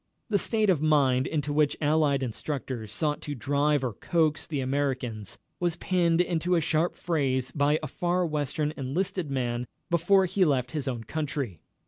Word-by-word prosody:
The 205 -2 +2
state 215 -2 +2
of 160 -6 +1
mind 135 -4 +3
into 150 -2 -1
which 150 -1 +2
Allied 150 -3 +2
instructors 125 -2 -4
sought 150 +8 -1
to 145 - -5
drive 145 +3 +1
or 125 -4 -1
coax 155 - 0
the 150 -3 -2
Americans 130 -6 -2 0.2
was 175 -2 0
pinned 175 -3 +1
into 175 0 +1
a - - +4
sharp 160 +2 +1
phrase 135 -6 0
by 145 +2 +2
a - - -2
Far 180 +1 0
Western 150 -1 -1
enlisted 155 +5 -2
man 125 -2 -2 0.2
before 185 +3 +4
he 190 +1 +2
left 130 -6 +1
his 145 -3 -3
own 120 -3 -3
country. 140 - -3
150 Hz, 165 wpm, -27 LUFS, 130-165 Hz, 0.2 s, a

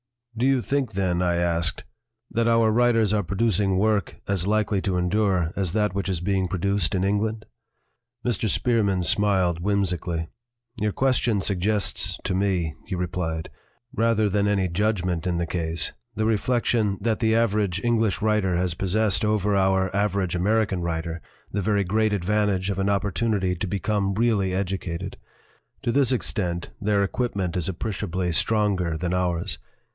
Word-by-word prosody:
"Do 120 +3 +1
you 135 -3 +2
think, 135 -2 -1
then," 90 -2 0
I 90 -1 +1
asked, 85 -2 0 0.5
"that 115 0 +1
our 115 -1 +4
writers 115 -2 +3
are 105 - +2
producing 100 0 +1
work 105 -2 +1
as 95 -2 0
likely 105 -2 +1
to 95 -2 -1
endure 90 -2 +1
as 95 -4 -1
that 105 -3 +1
which 100 0 -2
is 90 -3 -1
being 95 0 0
produced 95 -1 0
in 95 - 0
England?" 105 +3 0 0.8
Mr. 115 -2 0
Spearman 100 -4 +1
smiled 95 -3 +2
whimsically. 90 -4 -1 0.5
"Your 105 -1 0
question 125 -5 +1
suggests 100 -1 -1
to 95 - -1
me," 90 -5 0
he 95 - -3
replied, 85 -2 -3 0.4
"rather 115 -3 +2
than 100 +1 +1
any 100 -2 +1
judgment 90 -2 -1
in 90 -1 0
the 85 - 0
case, 80 -2 -1 0.2
the 110 - 0
reflection 110 -2 +1
that 110 +1 0
the 110 -2 +2
average 105 -5 +1
English 115 -4 +1
writer 105 -4 +2
has 90 -1 0
possessed 95 +1 +1
over 105 -1 +1
our 95 0 +2
average 100 -3 0
American 100 +1 +1
writer 85 0 -3 0.3
the 100 - -1
very 100 +1 +1
great 110 +3 +1
advan 105 +2 +1
tage 95 -1 0
of 100 - -3
an 95 +1 +1
opportunity 100 -1 0
to 90 +3 -3
become 100 0 -1
really 105 -4 +2
educated; 95 -1 -3 0.7
to 120 - +1
this 135 0 +2
extent 90 -8 -2
their 100 -1 +2
equipment 100 -4 -2
is 90 -1 -1
appreciably 95 -2 -2
stronger 95 -3 +1
than 90 +2 -2
ours. 90 -1 0
100 Hz, 155 wpm, -24 LUFS, 90-110 Hz, 0.8 s, our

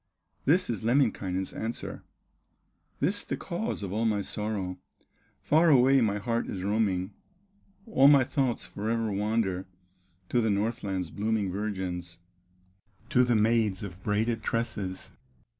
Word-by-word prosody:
This 180 +6 +3
is 115 -2 -3
Lemminkainen's 105 -7 +1
answer: 115 +2 -5 1.0
"This 190 +9 0
the - - -3
cause 185 - -3
of 95 -1 -4
all 110 +2 0
my 105 -2 +1
sorrow; 100 -3 -3 0.6
Far 160 +3 +4
away 135 -1 +6
my 105 -3 +1
heart 115 +2 -1
is 95 -2 -4
roaming, 100 -3 0 0.7
All 140 -12 +5
my 140 -2 +7
thoughts 130 -2 -1
forever 110 +1 -2
wander 100 -2 -1 0.6
To 120 - +2
the 110 - +1
Northland's 100 -4 -1
blooming 105 -2 -1
virgins, 90 -4 -4 0.9
To 125 -4 +5
the 120 -1 +2
maids 110 -3 +2
of 95 -2 -8
braided 110 +3 0
tresses. 105 -5 -3
110 Hz, 125 wpm, -28 LUFS, 100-120 Hz, 1.0 s, my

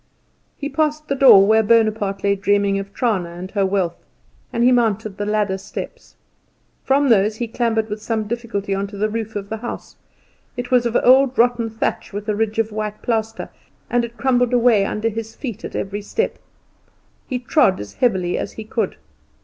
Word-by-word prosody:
He 285 - -4
passed 305 0 -1
the 275 - +1
door 255 -8 +8
where 220 +2 +4
Bonaparte 215 -3 +1
lay 200 0 +3
dreaming 200 0 +1
of 195 0 -7
Trana 200 -7 -1
and 185 +2 -8
her 200 -2 +1
wealth, 190 -3 -1 0.5
and 235 - 0
he 250 - +5
mounted 220 -4 +1
the 205 - -2
ladder 210 -2 0
steps. 195 - -8 0.7
From 275 +1 +2
those 210 -1 +3
he 235 +1 -3
clambered 225 -1 0
with 210 0 -5
some 220 -1 -1
difficulty 220 -4 -3
on 195 +1 -2
to 200 0 -10
the 215 +2 0
roof 220 -1 -4
of 200 -1 -4
the 220 - -3
house. 240 +2 -7 0.6
It 245 0 -5
was 245 -1 +4
of 235 - +1
old 260 +1 +5
rotten 240 -1 +2
thatch 220 -1 -3
with 205 +1 -5
a 210 - 0
ridge 220 0 -1
of 225 -1 0
white 210 0 -5
plaster, 225 -1 -2 0.4
and 240 0 +2
it 235 0 -7
crumbled 250 -2 +2
away 235 -5 +4
under 215 +2 -2
his 225 0 -5
feet 235 -5 -6
at - - -7
every 200 +1 -3
step. 450 - -2 0.9
He 255 - -2
trod 245 -5 +2
as 105 -1 -8
heavily 190 -8 0
as - - -5
he 220 - -7
could. 215 - -2
220 Hz, 190 wpm, -20 LUFS, 200-240 Hz, 0.9 s, door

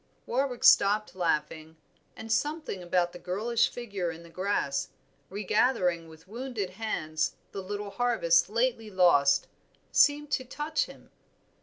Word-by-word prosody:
Warwick 255 0 -1
stopped 210 +2 +5
laughing, 160 -2 -2 0.4
and 225 0 -8
something 295 - -1
about 175 0 0
the 175 - -9
girlish 220 +7 0
figure 200 -7 -4
in 165 0 -8
the 170 - -15
grass, 165 -7 -1 0.4
regathering 190 -4 +1
with 160 +2 -16
wounded 225 -3 -5
hands 165 -7 -2 0.2
the 195 - -5
little 205 +1 -5
harvest 200 -7 +2
lately 230 0 0
lost, 170 -8 +4 0.5
seemed 295 0 +3
to 260 - 0
touch 295 +5 -2
him. - - -15
200 Hz, 130 wpm, -28 LUFS, 170-235 Hz, 0.5 s, stopped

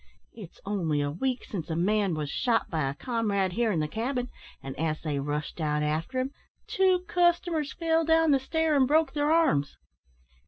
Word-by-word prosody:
It's 200 -7 -12
only 175 -7 -1
a 145 0 -1
week 250 - -2
since 175 -6 -6
a 160 - -1
man 195 +1 +1
was 150 -1 -3
shot 235 -3 0
by 155 -5 0
a 140 - -5
comrade 205 - -1
here 230 +1 +1
in 170 - 0
the 150 - -1
cabin, 245 - -3 0.3
an' 135 0 -5
as 155 +1 -2
they 150 -3 -1
rushed 150 +3 -4
out 150 -1 0
after 160 +12 -1
him, 260 +1 -2 0.3
two 375 -1 +2
customers 345 -5 +1
fell 330 -1 +1
down 325 -1 +3
the 275 - +4
stair 320 +3 0
and 265 -2 +4
broke 310 +3 +2
their 295 0 +1
arms. 155 - +2
225 Hz, 190 wpm, -28 LUFS, -, 0.3 s, the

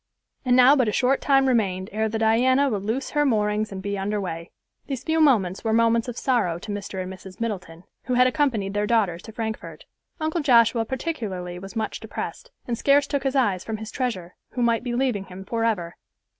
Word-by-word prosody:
And 250 -1 +3
now 255 +3 +7
but 255 -5 +2
a - - +1
short 260 +5 +2
time 270 -1 +4
remained 195 -6 0
ere 220 +1 0
the 220 - -2
Diana 255 +5 +3
would 205 -3 -1
loose 225 +7 -3
her 295 0 +2
moorings 215 -4 +1
and 190 -1 -6
be 200 0 -2
under 205 +2 -1
way. 170 -3 -5 0.4
These 270 -3 -4
few 320 +1 +1
moments 205 - +3
were 220 -1 0
moments 230 +1 +3
of 245 -1 -6
sorrow 230 -11 +1
to 190 +4 -7
Mr. 200 -2 -4
and 185 +1 -6
Mrs. 185 0 -12
Middleton, 185 -7 -5 0.2
who 250 - 0
had 250 +1 +5
accompanied 245 -8 0
their 205 0 0
daughters 200 -7 +1
to 220 - -10
Frankfort. 220 -1 -6 0.3
Uncle 315 +2 -1
Joshua 235 -4 +4
particularly 210 - -4
was 195 +4 -10
much 220 -1 -2
depressed, - - -6 0.2
and 235 -2 -2
scarce 280 0 +4
took 280 -1 -2
his 270 0 -1
eyes 205 -9 +2
from 220 -1 -4
his 220 +1 -8
treasure, 190 -9 -3 0.2
who 245 - -1
might 235 -1 +2
be 240 -1 -2
leaving 245 -6 0
him 190 +1 -10
forever. 220 -6 -1
225 Hz, 210 wpm, -24 LUFS, 195-255 Hz, 0.4 s, now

